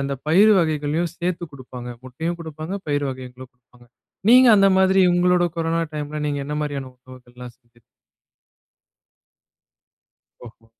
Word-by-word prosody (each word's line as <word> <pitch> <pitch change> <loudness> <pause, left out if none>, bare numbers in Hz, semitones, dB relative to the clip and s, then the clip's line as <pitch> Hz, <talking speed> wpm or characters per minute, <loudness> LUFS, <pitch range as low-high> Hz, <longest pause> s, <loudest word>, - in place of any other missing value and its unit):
அந்த 140 0 -2
பயிர் 205 +7 +5
வகைகளையும் 155 +1 -1
சேர்த்துக் 175 -2 -3
குடுப்பாங்க. 125 -2 -9
முட்டையும் 160 +7 -5
குடுப்பாங்க, 160 +3 -7
பயிர் 145 0 0
வகைகளும் 130 0 -10
குடுப்பாங்க. 125 -1 -24 0.4
நீங்க 255 0 +7
அந்த 195 0 +5
மாதிரி 190 0 +3
உங்களுடைய 175 0 +2
கொரோனா 165 0 0
டைம்ல 150 0 -5
நீங்க 145 -1 -2
என்ன 150 0 -4
மாதிரியான 140 -3 -5
உணவுகள் 125 -1 -17
எல்லாம் 125 -1 -10
செய்தீங்க? 120 -1 -30 2.6
ஓஹோ! 115 0 -16
150 Hz, 130 wpm, -21 LUFS, 130-170 Hz, 2.6 s, நீங்க